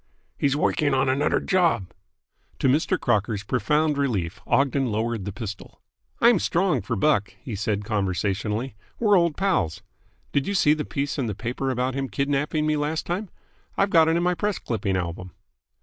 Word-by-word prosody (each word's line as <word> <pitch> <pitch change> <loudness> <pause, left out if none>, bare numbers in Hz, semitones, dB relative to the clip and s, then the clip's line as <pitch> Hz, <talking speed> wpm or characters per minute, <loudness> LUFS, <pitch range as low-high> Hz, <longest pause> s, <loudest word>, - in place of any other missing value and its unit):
"He's 140 -1 +1
woiking 145 -1 +1
on 130 0 +2
anudder 140 +3 +2
job!" 170 - +1 0.6
To - - +1
Mr. 160 +7 +2
Crocker's 105 -3 0
profound 150 +6 +1
relief 105 -10 -1
Ogden 140 -1 +2
lowered 110 -1 -2
the 100 - -3
pistol. 105 -1 -8 0.4
"I'm 235 -4 +5
strong 175 - +1
for 100 - -3
Buck," 100 -5 +1
he 120 - -7
said 105 0 -2
conversationally. 105 +4 -1 0.3
"We're 210 -3 +4
old 170 -4 +2
pals. 180 - 0 0.5
Did 140 - 0
you 200 - -1
see 150 -5 +4
the 155 -1 -3
piece 140 0 -3
in 125 - 0
the 105 - -3
paper 125 +5 -3
about 130 0 -1
him 135 0 -3
kidnapping 140 +6 0
me 155 0 +2
last 150 +2 -2
time? 185 +3 -3 0.5
I've 195 0 +2
got 165 -2 +6
it 165 +1 +3
in 170 - 0
my 180 0 +2
press 205 +2 -1
clipping 100 -5 -2
album." 90 0 -5
135 Hz, 175 wpm, -24 LUFS, 105-155 Hz, 0.6 s, got